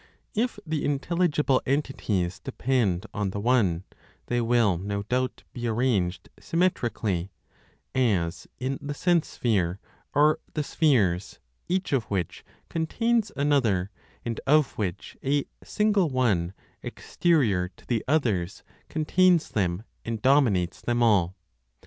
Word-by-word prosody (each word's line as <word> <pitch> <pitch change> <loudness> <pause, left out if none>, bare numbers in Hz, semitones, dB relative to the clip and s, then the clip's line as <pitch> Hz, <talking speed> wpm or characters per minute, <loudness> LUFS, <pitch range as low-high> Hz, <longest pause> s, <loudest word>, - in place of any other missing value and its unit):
If 235 +3 0
the 155 -2 -2
intelligible 150 -1 +1
entities 110 -10 -1
depend 115 -8 0
on 105 -2 -1
the 100 - -4
One, 100 -7 +2 0.4
they 120 0 0
will 115 -6 +3
no 100 +1 -3
doubt 125 +4 -2
be 120 -1 -3
arranged 110 -6 0
symmetrically, 115 - 0 0.6
as, 90 -10 0
in 130 +1 -3
the 145 0 -4
sense 175 0 +2
sphere, 95 -6 0 0.4
are 150 +2 +4 0.2
the 150 - 0
spheres, 110 - +1 0.3
each 185 -3 0
of 125 -5 +1
which 95 -5 -3 0.2
contains 225 +7 0
another, 120 -10 +2 0.3
and 115 -2 -3
of 150 0 +4
which 95 -3 -4
a 140 +1 +1 0.2
single 210 -5 +2
One, 105 -10 +1 0.3
exterior 115 - +1
to - - -20
the 115 -3 -1
others, 110 - 0 0.3
contains 170 +2 +3
them, 95 -1 -1 0.2
and 115 -1 -3
dominates 115 -9 +3
them 120 0 +1
all. 95 -5 +3
120 Hz, 120 wpm, -26 LUFS, 100-150 Hz, 0.6 s, are